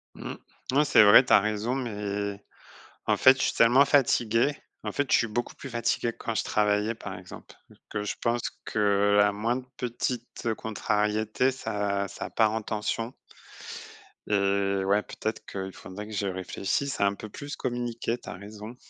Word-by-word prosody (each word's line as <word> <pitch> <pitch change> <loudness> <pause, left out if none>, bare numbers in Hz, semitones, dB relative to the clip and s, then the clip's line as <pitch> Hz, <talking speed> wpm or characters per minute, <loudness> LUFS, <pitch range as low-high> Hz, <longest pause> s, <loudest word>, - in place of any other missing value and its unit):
Mmh. - - -6 0.4
Oui, 145 +2 +4
c'est 120 - +7
vrai, 105 +5 +8
tu - - +2
as - - +9
raison, 105 +4 -1
mais, 100 -4 -3 0.6
en - - +3
fait, 130 0 +7
je - - -1
suis - - +2
tellement 120 +4 +6
fatigué, 120 -2 +3 0.3
en - - -3
fait, 145 -1 -1
je - - +7
suis 115 - +2
beaucoup 120 +2 -3
plus 135 - -8
fatigué 120 -1 0
que - - -27
quand 115 - -3
je - - 0
travaillais 105 +1 +1
par 115 - -7
exemple, - - -12 0.4
que 105 0 -3
je 105 - -2
pense 120 0 +1 0.2
que 100 -1 +2
la 105 0 +4
moindre 120 +5 -2
petite, 120 0 -4
heu, 115 - +2
contrariété, 110 +3 0
ça 100 -6 -2
ça 100 - -7
part 110 -2 +3
en 110 0 -2
tension 110 +3 -3 1.2
et 100 -1 +1
ouais, 100 +2 +3
peut-être 110 0 -5
qu'il 95 -1 -6
faudrait 105 +3 -9
que 110 - -9
je 100 -1 -1
réfléchisse 95 +8 -2
à 100 - +5
un 100 - +1
peu 110 - -8
plus 145 +6 -7
communiquer, 120 -1 -2
tu - - -11
as - - -5
raison. 105 +4 -9
110 Hz, 180 wpm, -27 LUFS, 100-120 Hz, 1.2 s, as